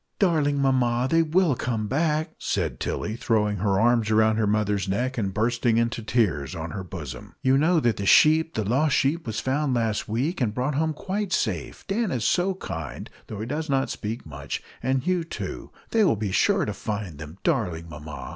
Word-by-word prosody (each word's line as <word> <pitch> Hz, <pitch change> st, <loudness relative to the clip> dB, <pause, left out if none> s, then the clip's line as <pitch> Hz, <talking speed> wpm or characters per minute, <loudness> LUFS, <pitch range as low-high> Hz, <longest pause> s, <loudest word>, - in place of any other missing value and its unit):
"Darling 150 Hz, -7 st, +2 dB
mamma, 125 Hz, -3 st, +2 dB
they 165 Hz, +4 st, +3 dB
will 165 Hz, 0 st, +3 dB
come 115 Hz, -3 st, -2 dB
back!" 155 Hz, +6 st, 0 dB
said 80 Hz, -10 st, -2 dB
Tilly, 110 Hz, -, -2 dB
throwing 105 Hz, -3 st, +1 dB
her 100 Hz, 0 st, +1 dB
arms 115 Hz, -1 st, +3 dB
round 110 Hz, 0 st, +4 dB
her 110 Hz, -, +2 dB
mother's 105 Hz, -2 st, 0 dB
neck, 125 Hz, +7 st, -1 dB
and 100 Hz, -5 st, -1 dB
bursting 115 Hz, +2 st, +1 dB
into 115 Hz, 0 st, 0 dB
tears 100 Hz, -, 0 dB
on 80 Hz, 0 st, -5 dB
her 95 Hz, -2 st, -5 dB
bosom. 75 Hz, -9 st, -8 dB
"You 130 Hz, 0 st, +4 dB
know 160 Hz, +5 st, +4 dB
that 120 Hz, -8 st, +1 dB
the 100 Hz, -, -3 dB
sheep 160 Hz, +6 st, +5 dB
the 110 Hz, -, 0 dB
lost 135 Hz, +8 st, +2 dB
sheep 150 Hz, +2 st, +1 dB
was 110 Hz, 0 st, -2 dB
found 135 Hz, 0 st, 0 dB
last 115 Hz, -3 st, -1 dB
week, 135 Hz, -, -1 dB
and 110 Hz, -3 st, 0 dB
brought 130 Hz, +4 st, 0 dB
home 160 Hz, +3 st, 0 dB
quite 195 Hz, +4 st, -3 dB
safe. -, -, -2 dB
Dan 215 Hz, +2 st, 0 dB
is 120 Hz, -9 st, -1 dB
so 185 Hz, +1 st, +2 dB
kind, 85 Hz, -, -6 dB, 0.2 s
though 105 Hz, -1 st, -6 dB
he -, -, -3 dB
does 150 Hz, +5 st, -3 dB
not 135 Hz, -1 st, +1 dB
speak 110 Hz, +2 st, -5 dB
much, 70 Hz, -2 st, -6 dB, 0.2 s
and 130 Hz, -1 st, 0 dB
Hugh 180 Hz, 0 st, +1 dB
too. 165 Hz, -, -6 dB, 0.2 s
They 225 Hz, -1 st, +4 dB
will 170 Hz, -, +4 dB
be 105 Hz, -2 st, -3 dB
sure -, -, +3 dB
to -, -, -3 dB
find 100 Hz, -8 st, -5 dB
them, 75 Hz, +3 st, -9 dB
darling 90 Hz, -, 0 dB
mamma!" 75 Hz, -3 st, -8 dB
120 Hz, 200 wpm, -25 LUFS, 105-150 Hz, 0.2 s, sheep